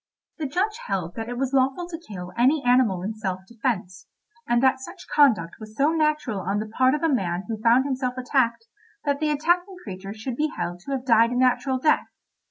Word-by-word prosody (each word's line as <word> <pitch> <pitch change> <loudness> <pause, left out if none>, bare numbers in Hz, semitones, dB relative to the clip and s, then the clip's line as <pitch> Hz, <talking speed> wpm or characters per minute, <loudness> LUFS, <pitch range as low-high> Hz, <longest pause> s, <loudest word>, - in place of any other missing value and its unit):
The 305 - -1
judge 405 - -1
held 180 -4 -2
that 225 0 -5
it 245 - -4
was 265 +1 -1
lawful 270 +6 +1
to 335 -1 -7
kill 180 -3 -7
any 265 +4 +3
animal 245 -8 +3
in 210 +3 -3
self 190 -4 -4
defence, 210 -6 -3 0.4
and 240 - +3
that 260 0 +4
such 345 +8 -10
conduct 220 - +3
was 215 -1 -11
so 285 +3 +3
natural 305 -8 0
on 195 +2 -1
the 215 - -2
part 255 +5 +2
of 300 - -4
a 325 -3 +3
man 180 -6 -1
who 220 -2 -4
found 240 +3 +4
himself 260 -2 -2
attacked, 240 -3 0 0.4
that 285 -1 0
the 305 0 0
attacking 350 +6 +1
creature 195 -1 -7
should 235 +3 -5
be 305 - +2
held 175 +1 -3
to 200 +10 -9
have 260 -1 -3
died 230 -2 +5
a 245 - -3
natural 255 +1 +2
death. 305 +4 +2
250 Hz, 210 wpm, -24 LUFS, 215-285 Hz, 0.4 s, died